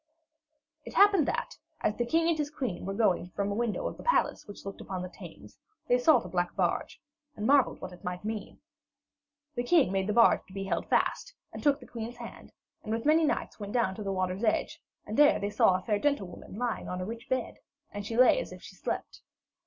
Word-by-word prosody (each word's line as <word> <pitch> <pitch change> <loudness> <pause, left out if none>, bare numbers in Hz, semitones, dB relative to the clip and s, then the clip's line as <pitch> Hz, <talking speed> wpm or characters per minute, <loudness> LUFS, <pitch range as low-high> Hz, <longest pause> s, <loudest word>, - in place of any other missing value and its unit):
It - - -10
happened 400 -6 +6
that, - - -2 0.3
as 210 - +1
the 240 - -1
king 325 +5 +2
and 335 - +3
his 300 -2 -2
queen 245 - -4
were 195 - -2
looking 195 -5 +2
from 200 0 -1
a - - 0
window 230 0 -1
of - - -6
the - - -10
palace - - +1
which 205 - -11
looked 195 - -7
upon 185 -2 -5
the 185 - -6
Thames, - - -13 0.3
they 245 0 +4
saw 305 +3 +6
the 235 - -4
black 175 -1 -1
barge, - - -1 0.4
and 210 - -4
marvelled 275 +1 +4
what - - -7
it 180 - -15
might 180 +2 -5
mean. 215 -2 -5 0.9
The 245 - -1
king 265 - +3
made 190 0 0
the 210 - 0
barge 230 +1 +5
to 190 - -15
be 195 - -3
held 195 - -2
fast, - - 0 0.2
and - - -7
took 290 -1 +3
the - - -12
queen's 235 +1 -7
hand, - - -10 0.3
and 215 - -6
with 225 +1 -2
many 315 +2 +5
knights 295 - -2
went 205 -1 -6
down 235 -6 +2
to 210 - -8
the 195 -1 -2
water's 185 +2 -2
edge, 220 - 0 0.2
and 215 - -5
there 295 +1 +6
they 205 +1 -2
saw 190 -2 +4
a 185 - -3
fair 210 -2 0
gentlewoman 205 -11 -2
lying 240 -1 -2
on 180 - -3
a 185 - -3
rich 230 +3 -7
bed, 255 -2 -2 0.3
and 205 0 -5
she 225 +3 -4
lay 255 - +6
as - - -5
if - - -11
she - - -11
slept. - - -5
225 Hz, 230 wpm, -29 LUFS, 195-260 Hz, 0.9 s, happened